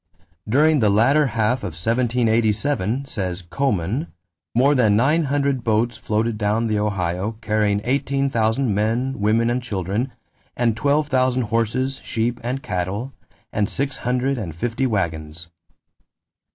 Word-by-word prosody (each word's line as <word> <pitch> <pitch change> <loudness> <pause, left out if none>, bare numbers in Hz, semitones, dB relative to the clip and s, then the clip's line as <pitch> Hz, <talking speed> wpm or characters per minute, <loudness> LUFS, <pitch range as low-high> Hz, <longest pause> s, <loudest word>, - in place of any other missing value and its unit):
"During 150 +5 +4
the 110 -4 +3
latter 135 +9 +4
half 115 +2 +1
of 90 - -5
1787," 115 - +1
says 95 -7 -4
Coman, 110 - -1 0.5
"more 135 +4 +4
than 115 -7 +3
nine 150 +8 +3
hundred 140 -2 0
boats 115 +1 +1
floated 110 0 -1
down 105 +2 +1
the 110 -2 0
Ohio 95 0 -1
carrying 105 -2 0
eighteen 140 +2 0
thousand 115 -1 +1
men, 115 +6 0
women, 115 +3 +2
and 125 +1 0
children, 105 +3 -2 0.5
and 115 -3 +2
twelve 145 +5 +1
thousand 130 -2 +2
horses, 115 +4 -1
sheep, 120 +2 -1
and 130 +4 -3
cattle, 100 +4 -3 0.4
and 105 0 0
six 140 +2 -2
hundred 125 +2 0
and 85 -8 -5
fifty 120 +8 -1
wagons." 80 -5 -3
115 Hz, 135 wpm, -22 LUFS, 105-130 Hz, 0.5 s, During